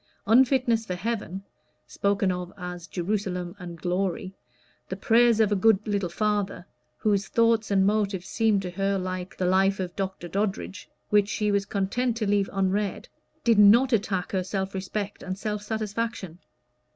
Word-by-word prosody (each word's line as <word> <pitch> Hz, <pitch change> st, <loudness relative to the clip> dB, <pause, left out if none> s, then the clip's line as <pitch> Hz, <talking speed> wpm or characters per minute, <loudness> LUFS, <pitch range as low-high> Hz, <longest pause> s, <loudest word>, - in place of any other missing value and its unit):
Unfitness 245 Hz, 0 st, +4 dB
for 185 Hz, -5 st, -4 dB
heaven 195 Hz, -1 st, -4 dB, 0.4 s
(spoken 200 Hz, -1 st, 0 dB
of 180 Hz, 0 st, -5 dB
as 180 Hz, -2 st, -7 dB
"Jerusalem" 180 Hz, -1 st, -3 dB
and 175 Hz, -2 st, -8 dB
"glory"), 185 Hz, +1 st, -2 dB, 0.6 s
the -, -, -3 dB
prayers 235 Hz, -1 st, +4 dB
of 215 Hz, -2 st, +3 dB
a -, -, +3 dB
good 215 Hz, +2 st, +5 dB
little 200 Hz, -4 st, -1 dB
father, 205 Hz, 0 st, -1 dB, 0.3 s
whose 200 Hz, -, +1 dB
thoughts 230 Hz, -2 st, +2 dB
and 195 Hz, -1 st, +3 dB
motives 200 Hz, -3 st, 0 dB
seemed 215 Hz, -4 st, +1 dB
to 180 Hz, -, -4 dB
her 195 Hz, +2 st, 0 dB
like 185 Hz, 0 st, -5 dB
the 185 Hz, -, -1 dB
"Life 195 Hz, +2 st, +3 dB
of 180 Hz, -2 st, -4 dB
Dr. 190 Hz, -2 st, -4 dB
Doddridge," 195 Hz, +1 st, -3 dB, 0.2 s
which 205 Hz, -1 st, +4 dB
she 210 Hz, 0 st, 0 dB
was 200 Hz, -1 st, 0 dB
content 225 Hz, +5 st, -1 dB
to 220 Hz, -, -1 dB
leave 200 Hz, -1 st, +1 dB
unread, 195 Hz, +1 st, -1 dB, 0.3 s
did 230 Hz, -3 st, +4 dB
not 235 Hz, +6 st, +6 dB
attack 195 Hz, -4 st, 0 dB
her 190 Hz, -2 st, 0 dB
self 190 Hz, +1 st, -3 dB
respect 195 Hz, +2 st, -4 dB
and 185 Hz, 0 st, -5 dB
self 210 Hz, 0 st, -3 dB
satisfaction. 215 Hz, -4 st, -4 dB
200 Hz, 160 wpm, -26 LUFS, 185-215 Hz, 0.6 s, not